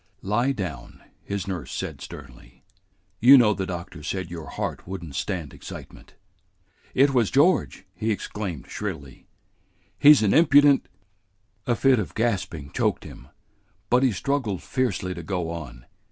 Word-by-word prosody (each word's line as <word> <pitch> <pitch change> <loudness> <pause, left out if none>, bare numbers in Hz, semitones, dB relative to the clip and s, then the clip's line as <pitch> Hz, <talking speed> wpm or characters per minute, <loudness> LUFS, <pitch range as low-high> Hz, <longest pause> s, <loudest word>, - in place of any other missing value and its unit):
"Lie 120 +7 +1
down," 85 - -6 0.2
his 100 -1 -4
nurse 90 -9 -5
said - - -5
sternly. 65 -4 -12 0.6
"You 135 +4 +9
know 110 -4 +5
the 95 -2 -4
doctor 85 -4 -7
said 85 +3 -4
your 80 -3 -7
heart - - -5
would 95 -1 -6
n't 75 -5 -9
stand 85 -2 -4
excitement." - - -11 0.8
"It 135 +1 +4
was 120 -5 +3
George!" 145 - +2
he 110 +5 -3
exclaimed 100 - -4
shrilly. 80 -11 -7 0.7
"He's 145 -5 +7
an 100 - +3
impudent 145 -3 +5 0.4
" 100 +1 -41
A 120 - +2
fit 130 0 +3
of 90 -9 -5
gasping 90 -10 -2
choked - - 0
him, 65 - -12 0.6
but 125 +1 +5
he 130 -2 +3
struggled 110 -2 -2
fiercely 120 -8 -1
to 85 - -7
go 85 -1 -3
on. 65 -8 -8
100 Hz, 150 wpm, -25 LUFS, 85-125 Hz, 0.8 s, You